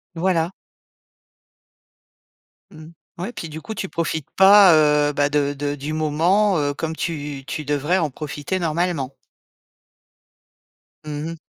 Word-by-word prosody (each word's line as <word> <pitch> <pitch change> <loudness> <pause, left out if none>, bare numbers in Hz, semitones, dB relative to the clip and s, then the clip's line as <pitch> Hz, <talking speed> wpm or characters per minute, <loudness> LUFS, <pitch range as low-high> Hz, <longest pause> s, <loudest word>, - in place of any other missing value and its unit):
Voilà. 170 -1 0 2.2
Mmh, 155 -2 -12 0.3
ouais 180 +6 -4
et - - -10
puis 165 - -7
du 155 +1 -7
coup 220 - -7
tu 190 - -4
profites 160 -3 -3
pas, 195 -1 +8
heu, 150 -1 +3
bah 145 0 +2
de 145 -1 +1
de 145 0 -3
du 145 +2 -6
moment, 170 +6 +2
heu, 145 -1 0
comme 160 +2 -4
tu 145 -5 -4
tu 155 - -5
devrais 145 +5 0
en 160 -5 0
profiter, 150 +5 -4
normalement. 165 -4 -1 1.9
Mmh 150 0 -5
mh. - - -7
155 Hz, 135 wpm, -21 LUFS, 145-175 Hz, 2.2 s, pas